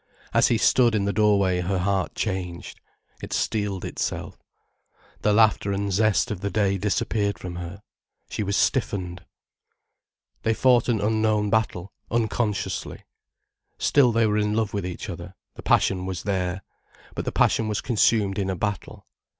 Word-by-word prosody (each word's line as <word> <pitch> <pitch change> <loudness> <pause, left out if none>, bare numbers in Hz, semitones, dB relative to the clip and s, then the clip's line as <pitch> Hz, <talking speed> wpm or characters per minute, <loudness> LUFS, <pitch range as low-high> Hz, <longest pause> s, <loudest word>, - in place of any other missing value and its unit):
As - - +5
he 115 - +2
stood 120 +1 +4
in 100 -2 +1
the 100 - 0
doorway 100 -3 +3
her 95 +2 -1
heart 95 0 -1
changed. 90 -4 -4 0.4
It - - -8
steeled 105 -4 -1
itself. - - -4 0.9
The 105 - +2
laughter 105 -2 +3
and 100 0 -2
zest 110 +4 +2
of 100 -4 -4
the 100 - -1
day 100 -2 +1
disappeared 105 0 0
from 90 -1 -7
her. 90 +4 -8 0.4
She - - -4
was 100 0 0
stiffened. 95 -8 -1 1.2
They 115 0 +1
fought 125 0 +3
an 110 -4 +1
unknown 110 -1 +1
battle, 105 -4 -1 0.2
unconsciously. 110 -2 -2 0.7
Still 135 -4 +4
they 115 0 +2
were 105 0 +1
in 105 0 0
love 110 -2 0
with 100 -3 -2
each 90 +4 -6
other, 90 -1 -8 0.2
the - - -10
passion 95 -1 +2
was 95 -2 -4
there. 95 -1 -2 0.5
But - - -4
the - - -1
passion 110 - +2
was 105 -1 -1
consumed 105 -4 +2
in 95 -1 -1
a 95 - -1
battle. 105 +2 -4
100 Hz, 160 wpm, -24 LUFS, 95-110 Hz, 1.2 s, As